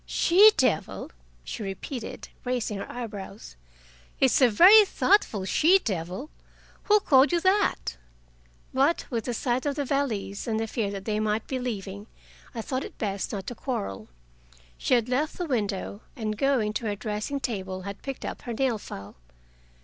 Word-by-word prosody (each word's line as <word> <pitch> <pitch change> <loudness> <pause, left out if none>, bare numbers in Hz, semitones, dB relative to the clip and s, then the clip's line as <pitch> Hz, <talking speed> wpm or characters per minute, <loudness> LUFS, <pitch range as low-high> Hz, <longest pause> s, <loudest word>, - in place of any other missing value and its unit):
"'She 395 +5 +6
devil'!" 205 -11 0 0.3
she - - -6
repeated, 215 +5 -6
raising 245 -5 -2
her - - -6
eyebrows. 210 - -7 0.6
"It's 265 0 +4
a 255 - +7
very 380 - +8
thoughtful 380 - +2
she 330 - +5
devil. 190 - -4 0.5
Who 420 0 +5
called 270 -1 +5
you 345 - +2
that?" 380 - +1 0.8
But, 275 +6 +2
with 230 -3 -2
the 245 - -2
sight 245 +2 0
of 285 - -1
the 290 -1 -2
valise 245 -8 -2
and 220 -1 0
the 225 - -1
fear 225 -2 -2
that 195 -1 -6
they 215 -1 -1
might 215 0 0
be 260 - -3
leaving, 205 -4 -5 0.5
I 225 - -3
thought 260 +3 -2
it - - -10
best 200 -3 -3
not 195 -3 -5
to - - -5
quarrel. 100 - -4 0.7
She 255 - +2
had 235 -1 +1
left 280 +5 -1
the 355 - -2
window, 205 - -2
and 215 -2 -3
going 235 -3 +1
to 225 +1 -3
her 205 - -1
dressing 215 +6 -3
table, 190 -7 -4
had 200 +1 -7
picked 270 -1 -6
up - - -5
her 240 - -5
nail 240 -2 0
file. 100 - -9
230 Hz, 170 wpm, -26 LUFS, 205-270 Hz, 0.8 s, very